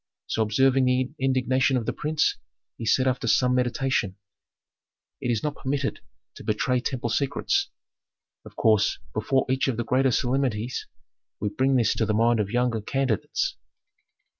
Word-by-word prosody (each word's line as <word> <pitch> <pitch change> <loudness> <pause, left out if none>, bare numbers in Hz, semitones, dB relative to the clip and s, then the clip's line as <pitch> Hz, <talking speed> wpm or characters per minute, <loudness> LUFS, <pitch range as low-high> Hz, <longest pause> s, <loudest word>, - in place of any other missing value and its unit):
So, - - -1
observing 130 +5 +3
the 125 +1 +1
indignation 130 0 +2
of 115 - -3
the - - -1
prince, 150 0 0 0.4
he 115 - -6
said 130 +4 +3
after 125 -2 0
some 125 +2 +3
meditation, 125 -5 0 1.1
"It 125 - -2
is 115 -3 0
not 150 -1 -2
permitted 140 +1 -2 0.4
to - - -10
betray 125 +4 0
temple 125 -1 -3
secrets. 140 +4 0 0.7
Of - - -14
course, 110 -2 +3 0.2
before 130 +5 +1
each 130 +1 +1
of 130 -4 -1
the 120 - -2
greater 130 +2 +2
solemnities, 125 -2 -1 0.5
we 105 - -1
bring 135 0 +1
this 120 -3 +3
to 110 - -1
the 105 - +1
mind 115 +1 +3
of 100 -2 0
younger 120 -1 0
candidates." 130 -2 -1
125 Hz, 155 wpm, -25 LUFS, 115-135 Hz, 1.1 s, observing